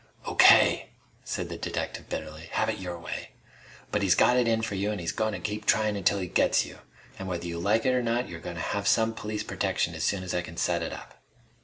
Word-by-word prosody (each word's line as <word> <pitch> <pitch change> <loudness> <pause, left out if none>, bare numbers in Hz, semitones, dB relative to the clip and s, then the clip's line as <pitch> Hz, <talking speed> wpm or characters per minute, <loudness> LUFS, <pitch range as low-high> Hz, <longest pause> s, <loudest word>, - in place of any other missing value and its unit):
"O.K.!" - - +6 0.3
said - - -4
the - - -5
detective - - -4
bitterly. 80 +1 -6
"Have 110 - +1
it 110 - -2
your 90 -2 -5
way! 85 - -7 0.6
But 105 - +1
he's 95 -3 +4
got 125 - +5
it 125 -2 +3
in 115 -1 +2
for 110 - -2
you 100 +2 -1
an' 105 - -3
he's 85 -3 -2
goin' 110 -1 -1
to - - -4
keep 105 0 -4
tryin' 110 -1 +3
until 100 0 +2
he 95 - -2
gets - - +3
you! - - -11 0.4
An' 95 - -5
whether 85 -2 -3
you 85 -1 -4
like 105 +5 +2
it 130 - +3
or 125 - +2
not, 120 +1 0
you're 85 - -8
goin' 90 +1 -7
to 80 - -4
have 100 +2 -2
some 115 0 +3
police 105 -1 -4
protection - - -1
as - - -4
soon 100 -2 0
as 90 - -4
I 90 - +1
can 85 -1 -10
set 85 -1 +1
it - - -3
up." - - -10
100 Hz, 250 wpm, -28 LUFS, 90-110 Hz, 0.6 s, O.K